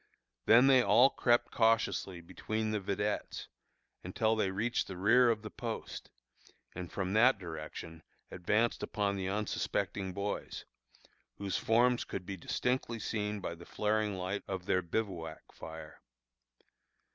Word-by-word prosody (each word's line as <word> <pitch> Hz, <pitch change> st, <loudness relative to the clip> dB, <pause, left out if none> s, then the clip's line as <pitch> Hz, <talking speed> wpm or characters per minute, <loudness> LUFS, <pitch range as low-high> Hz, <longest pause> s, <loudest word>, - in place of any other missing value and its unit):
Then 120 Hz, +3 st, +7 dB
they 135 Hz, -2 st, +6 dB
all 125 Hz, +2 st, +5 dB
crept 120 Hz, -1 st, +2 dB
cautiously 110 Hz, -5 st, +1 dB
between 110 Hz, +5 st, -3 dB
the 105 Hz, -, 0 dB
vedettes, 105 Hz, +2 st, -3 dB, 0.5 s
until 110 Hz, +5 st, +1 dB
they 105 Hz, -3 st, +1 dB
reached 110 Hz, +5 st, -1 dB
the 95 Hz, -, -7 dB
rear 120 Hz, +6 st, +5 dB
of 110 Hz, -2 st, 0 dB
the 105 Hz, -, -7 dB
post, 115 Hz, -2 st, -6 dB, 0.6 s
and 90 Hz, -1 st, -7 dB
from 95 Hz, -1 st, -2 dB
that 120 Hz, +3 st, +5 dB
direction 80 Hz, -2 st, -8 dB, 0.3 s
advanced 105 Hz, +6 st, +1 dB
upon 100 Hz, -1 st, -1 dB
the 95 Hz, -1 st, -2 dB
unsuspecting 100 Hz, -1 st, -2 dB
boys, 100 Hz, +2 st, -4 dB, 0.7 s
whose 100 Hz, -1 st, -2 dB
forms 120 Hz, +2 st, +3 dB
could 90 Hz, -, -6 dB
be 100 Hz, -, -5 dB
distinctly 120 Hz, +6 st, -1 dB
seen 105 Hz, -2 st, -3 dB
by 85 Hz, -, -4 dB
the 85 Hz, +1 st, -12 dB
flaring 105 Hz, +1 st, -1 dB
light 95 Hz, +2 st, -3 dB
of 95 Hz, -2 st, -4 dB
their 90 Hz, -, +2 dB
bivouac 85 Hz, -3 st, -4 dB
fire. 80 Hz, -1 st, -10 dB
105 Hz, 135 wpm, -32 LUFS, 95-115 Hz, 0.7 s, Then